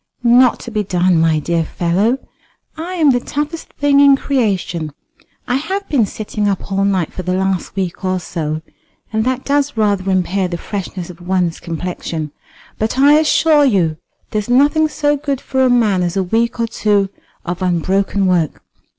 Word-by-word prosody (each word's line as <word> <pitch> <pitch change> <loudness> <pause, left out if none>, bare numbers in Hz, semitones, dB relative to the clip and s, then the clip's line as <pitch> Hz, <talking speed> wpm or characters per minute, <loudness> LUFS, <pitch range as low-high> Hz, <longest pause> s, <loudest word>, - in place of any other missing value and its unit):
"Not 245 +1 +5
to 240 - -8
be 215 -1 -1
done, 180 -2 +2
my 160 -1 +3
dear 165 +2 0
fellow. 185 +10 0 0.6
I 335 +3 -5
am 310 -5 +4
the 245 - +2
toughest 295 +6 -4
thing 285 -1 +3
in 280 -1 +7
creation. 190 - -1 0.5
I 250 - +1
have 385 +7 -3
been 245 -8 +2
sitting 210 0 -3
up 195 0 -3
all 195 0 +1
night 190 -5 0
for - - -5
the 185 0 -1
last 190 -1 -1
week 190 -1 -3
or 185 0 0
so, 155 -2 -4 0.5
and 220 0 +1
that 260 0 -1
does 285 -2 0
rather 200 -3 +1
impair 185 0 +1
the 175 -1 -4
freshness 185 -2 -5
of 175 0 -16
one's 175 -2 -1
complexion; 165 -2 -5 0.5
but 220 +3 -1
I 290 +3 +6
assure 310 -1 +4
you 180 - +2 0.3
there's 210 +1 -2
nothing 290 +5 +4
so 295 -1 0
good 280 -2 -2
for 265 -1 0
a 255 - +4
man 220 -6 +3
as 175 +2 -1
a 190 - +2
week 230 +6 0
or 230 - +2
two 205 -3 +1 0.4
of 175 +2 -4
unbroken 190 +3 0
work. 175 -5 0
200 Hz, 175 wpm, -17 LUFS, 180-265 Hz, 0.6 s, in